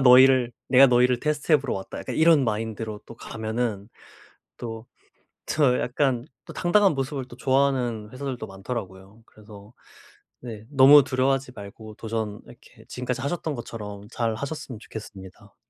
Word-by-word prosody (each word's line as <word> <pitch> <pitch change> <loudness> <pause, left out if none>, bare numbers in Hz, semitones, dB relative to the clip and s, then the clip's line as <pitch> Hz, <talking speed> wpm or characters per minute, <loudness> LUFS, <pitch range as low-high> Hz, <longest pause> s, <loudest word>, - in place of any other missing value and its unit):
너희를 130 -1 +6 0.2
내가 135 +1 +7
너희를 125 -1 +3
테스트해 150 +1 +2
보러 135 -2 -3
왔다.' 95 - -6
약간 - - -5
이런 160 -3 +5
마인드로 110 -1 -3
또 115 - -11
가면은 110 -2 -4 0.7
또 115 -1 -7 0.6
더 140 -5 +2
약간 125 -1 0 0.2
또 - - -10
당당한 190 +1 +3
모습을 135 -1 -3
또 120 - -12
좋아하는 130 -5 0
회사들도 130 -4 -5
많더라고요. 95 0 -7
그래서 105 +1 -15 0.7
네 110 -3 -8
너무 140 0 +8
두려워하지 130 -1 0
말고 105 +1 -10
도전 110 -2 -4
이렇게 - - -17
지금까지 125 0 -4
하셨던 155 +1 -3
것처럼 105 -4 -8
잘 115 -2 -1
하셨으면 140 -1 -6
좋겠습니다. 100 -5 -11
120 Hz, 350 characters per minute, -25 LUFS, 110-135 Hz, 0.7 s, 너무